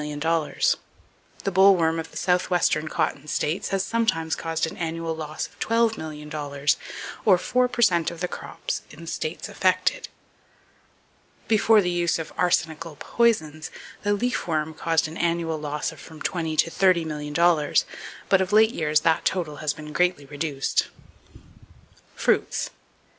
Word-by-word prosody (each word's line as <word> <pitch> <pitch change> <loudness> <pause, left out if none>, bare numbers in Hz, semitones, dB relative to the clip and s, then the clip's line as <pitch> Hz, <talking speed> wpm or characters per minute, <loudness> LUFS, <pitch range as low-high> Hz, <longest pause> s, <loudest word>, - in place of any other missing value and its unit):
The 150 0 0 0.7
boll 195 +1 +7
worm 165 -1 +1
of 165 - -5
the - - -10
southwestern 180 -3 +1
cotton 150 -1 -2
states 155 +4 -1
has 195 -1 0
sometimes 190 -9 0
caused 165 0 -1
an 160 - -6
annual 165 -1 -3
loss 155 -1 -4
of - - -16
$12,000,000, 150 -10 0 0.5
or 195 -4 +6
four 250 +7 +1
per 240 -1 0
cent 170 -6 +3
of 170 - -9
the 180 - -1
crops - - -5
in - - -13
the - - -9
states 160 0 -4
affected. 185 0 +1 1.4
Before 220 0 +5
the 180 - 0
use 175 -1 +1
of 160 - -6
arsenical 160 -2 0
poisons, 160 -10 +1 0.3
the 205 - +1
leaf 245 +2 -1
worm 160 -1 -1
caused 165 0 +1
an 160 - -8
annual 170 -2 0
loss 150 0 -3
of - - -14
from 160 -1 -12
twenty 160 -3 -2
to 165 +2 +3
thirty 180 -3 +3
million 150 -1 -5
dollars; 170 -2 +3 0.4
but 195 -1 +4
of 190 +1 -1
late 220 +1 +6
years 155 -6 +1
that 165 +1 +2
total 165 -6 -1
has 155 0 -1
been 150 0 -9
greatly 180 -4 +1
reduced. 145 -1 -1 1.3
Fruits. - - 0
165 Hz, 150 wpm, -25 LUFS, 155-185 Hz, 1.4 s, boll